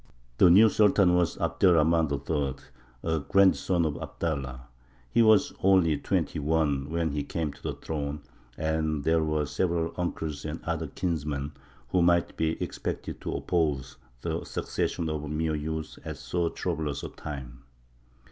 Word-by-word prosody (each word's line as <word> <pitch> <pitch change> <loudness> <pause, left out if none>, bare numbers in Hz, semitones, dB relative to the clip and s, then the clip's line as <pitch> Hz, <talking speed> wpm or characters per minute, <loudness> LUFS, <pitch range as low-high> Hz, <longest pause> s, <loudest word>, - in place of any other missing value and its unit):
The 90 - +8
new 100 +6 +8
Sultan 100 -3 +4
was 90 -2 +2
Abd - - -2
er 90 -2 +7
Rahmān 80 -1 +3
III., 70 -1 -1 0.5
a 80 -1 0
grandson 90 +2 +3
of 75 -2 -1
Abdallah. 70 -6 -3 0.5
He - - +4
was 110 -2 +5
only 95 -5 +4
twenty - - -1
one 75 -2 0
when 85 -1 0
he 75 0 -1
came 75 0 -3
to 70 - -18
the - - -3
throne, 75 -1 -4 0.3
and 80 -2 -1
there 80 +1 +3
were 75 -1 0
several 85 +3 -1
uncles 80 -4 -3
and 80 +2 -4
other 80 -1 -2
kinsmen 75 -3 -2 0.4
who 90 - +2
might 85 0 +3
be 80 0 -1
expected - - -5
to - - -3
oppose 75 -6 -1 0.3
the - - -2
succession 85 - -2
of 75 -1 -3
a 75 - -6
mere 80 +1 -1
youth 80 +1 -4
at - - -6
so 85 -1 -1
troublous 80 -6 -3
a - - -4
time. 65 -3 -8
80 Hz, 155 wpm, -28 LUFS, 75-85 Hz, 0.5 s, The